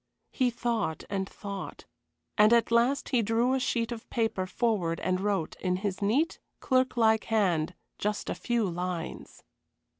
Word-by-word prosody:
He 255 -2 +2
thought 230 -8 -2
and 195 -1 -1
thought. 200 -1 -7 0.5
And 210 0 +6
at 235 0 +3
last 240 +4 +2
he 250 -4 +3
drew 230 +4 +2
a 265 - +2
sheet 235 -2 0
of 230 -1 -7
paper 220 -5 0
forward 185 -7 0
and 185 +1 0
wrote, 195 -5 -1
in 180 -1 0
his 190 0 -3
neat, 265 +12 +1 0.2
clerklike 240 -4 +2
hand, 180 -7 +1 0.2
just 210 0 -2
a - - -1
few 235 -4 0
lines. 180 -1 -5
220 Hz, 150 wpm, -29 LUFS, 185-235 Hz, 0.5 s, And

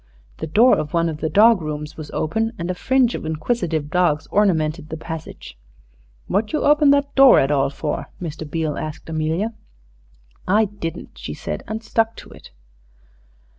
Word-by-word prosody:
The 160 - -5
door 225 +11 +5
of 150 +2 -4
one 170 0 +2
of 155 - -5
the 155 +1 -2
dog 215 +4 +5
rooms 150 -1 -5
was 155 -2 -8
open, 225 +9 -1
and 170 +1 -3
a - - -2
fringe 255 +5 +2
of - - -5
inquisitive 160 -1 -2
dogs 160 -4 +2
ornamented 160 -6 +1
the 160 - -5
passage. 160 - -8 0.7
"What 210 +2 -1
you 305 - 0
open 295 0 +5
that 280 0 +2
door 270 -1 +7
at 135 - +1
all 135 -2 +2
for?" 150 +2 -4
Mr. 155 -3 -6
Beale 155 -1 -2
asked 155 +1 -7
Amelia. 160 +8 -1 0.9
"I 210 +4 +4
didn't," 190 -5 -7
she - - -6
said, - - -5
and 220 +1 -5
stuck 225 0 0
to - - -12
it. - - -14
165 Hz, 170 wpm, -21 LUFS, 155-220 Hz, 0.9 s, door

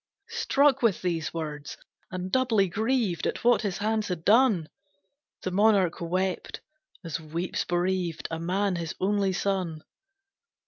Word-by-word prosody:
Struck 285 - +3
with 225 -7 +2
these 170 -3 -1
words, 150 -3 -5 0.3
and 185 -1 -5
doubly 230 -7 +3
grieved 220 -1 0
At - - -3
what 245 +1 +4
his 195 -5 -2
hands 215 0 0
had 175 -3 -4
done, 215 -7 +4 0.8
The 185 - -2
monarch 195 -3 +3
wept, 185 +2 -2 0.4
as 165 -1 -4
weeps 165 +3 -3
bereaved 175 -1 -1
A 165 - -3
man 185 +2 0
his 165 -2 -4
only 200 0 +1
son. 180 -4 -2
185 Hz, 135 wpm, -27 LUFS, 170-215 Hz, 0.8 s, what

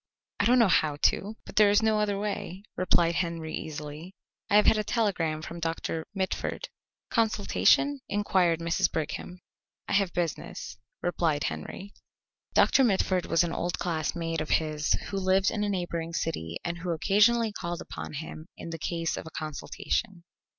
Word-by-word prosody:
"I - - +3
don't 250 +1 +5
know 230 -3 +6
how 155 -4 +3
to, 200 +8 +1
but - - -12
there 210 -1 +7
is 205 +2 +4
no 220 -1 +3
other 205 -1 +1
way," 200 -2 -4
replied 170 -2 +3
Henry 165 -2 -2
easily. 155 +4 -7 0.3
"I - - +3
have 210 - +6
had 220 - +5
a - - 0
telegram 175 -9 0
from 170 +2 -7
Doctor 165 -1 -3
Mitford." 190 0 -2 0.4
"Consultation?" 230 +5 +3
inquired 185 -5 +2
Mrs. 165 -1 +1
Brigham. 160 +3 -4 0.5
"I - - -2
have 200 -3 +3
business," 170 -3 -4 0.2
replied 165 -4 +1
Henry. 80 - -5 0.6
Doctor 270 - +5
Mitford 190 -5 +2
was 165 - +3
an 170 -1 -2
old 175 0 -2
classmate 165 -1 -2
of 155 - -4
his 155 -1 +1 0.2
who 195 - -3
lived 190 0 +3
in 210 -2 -1
a 205 - 0
neighbouring 170 -3 -2
city 85 - -2
and 170 0 -3
who 180 +1 -4
occasionally 210 +7 +3
called 175 -4 -4
upon - - -7
him 155 +1 -7
in 165 - -7
the 165 - -5
case 165 0 -2
of - - -6
a 160 - -9
consultation. 170 +5 -3
175 Hz, 165 wpm, -28 LUFS, 160-205 Hz, 0.6 s, there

